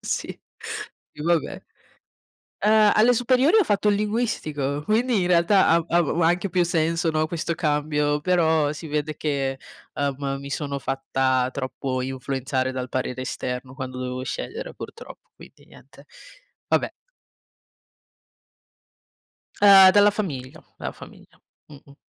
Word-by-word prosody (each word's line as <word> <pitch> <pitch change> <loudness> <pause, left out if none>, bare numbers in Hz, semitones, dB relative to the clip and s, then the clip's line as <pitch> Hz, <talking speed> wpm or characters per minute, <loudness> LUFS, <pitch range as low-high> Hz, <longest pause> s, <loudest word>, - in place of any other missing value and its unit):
Sì, - - -3 0.8
i 150 - -9
va 170 +2 +3
beh. - - -8 1.0
Ehm, 215 0 +5
alle 230 +3 +5
superiori 255 - +3
ho 425 - +5
fatto 210 - 0
il 205 - +3
linguistico, 155 - -2
quindi 225 +3 +1
in 175 - 0
realtà 180 +3 +4
av 165 0 +3
av 170 -3 +2
u - - +1
anche 175 +4 +2
più 180 0 +2
senso, 165 0 0
no, 155 0 +1
questo 170 0 -3
cambio, 150 -2 0
però 160 -3 +2
si 160 +2 -8
vede 150 0 -2
che, 135 -3 -2 0.4
ehm, 140 -1 -2
mi 140 0 -8
sono 140 -2 -3
fatta 130 -1 0
troppo 130 -1 -4
influenzare 130 0 -2
dal 130 -1 -5
parere 130 0 -3
esterno 125 0 -5
quando 130 -2 -7
dovevo 125 0 -4
scegliere, - - -6
purtroppo, 460 - -11
quindi - - -17
niente. - - -18 0.6
Vabbè. - - +1 2.7
Ehm, 195 -2 +9
dalla 205 +1 +5
famiglia, 145 -12 -5 0.2
dalla - - -5
famiglia. - - -15 0.3
Mh-mh. 140 -1 -16
155 Hz, 135 wpm, -23 LUFS, 135-190 Hz, 2.7 s, Ehm